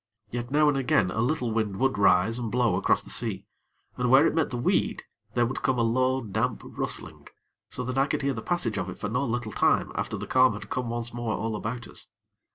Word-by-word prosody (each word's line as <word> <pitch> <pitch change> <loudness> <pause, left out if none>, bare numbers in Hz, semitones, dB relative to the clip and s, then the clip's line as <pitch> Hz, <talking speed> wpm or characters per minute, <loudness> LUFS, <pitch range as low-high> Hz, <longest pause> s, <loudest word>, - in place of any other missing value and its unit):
Yet 120 0 -4
now 150 +2 +4
and 145 - +3
again 110 -8 +2
a 110 - -1
little 125 -1 0
wind 110 -3 -1
would 135 +1 +1
rise 100 +3 +3
and 115 -3 -3
blow 120 -1 +2
across - - +2
the - - -6
sea, - - -1 0.5
and 125 -1 0
where 135 +4 +7
it - - +2
met 160 -1 +1
the 125 - -4
weed, 120 - 0 0.3
there 120 - +3
would 130 +3 -3
come 130 - +1
a 120 - +2
low, 130 +3 +2
damp 110 +2 -2
rustling, - - -3 0.4
so 125 - -3
that 130 +2 -2
I 135 - +3
could 145 - -2
hear 140 0 +1
the 115 - -5
passage 115 - -1
of 90 0 -3
it 90 - -7
for 105 - -4
no 125 +5 0
little 120 -3 -2
time - - +2
after - - -3
the - - -5
calm 130 0 +4
had - - -9
come 125 -2 -2
once 120 0 -3
more 120 -2 -2
all 110 +1 -2
about 115 +2 -4
us. - - -5
120 Hz, 240 wpm, -27 LUFS, 110-130 Hz, 0.5 s, where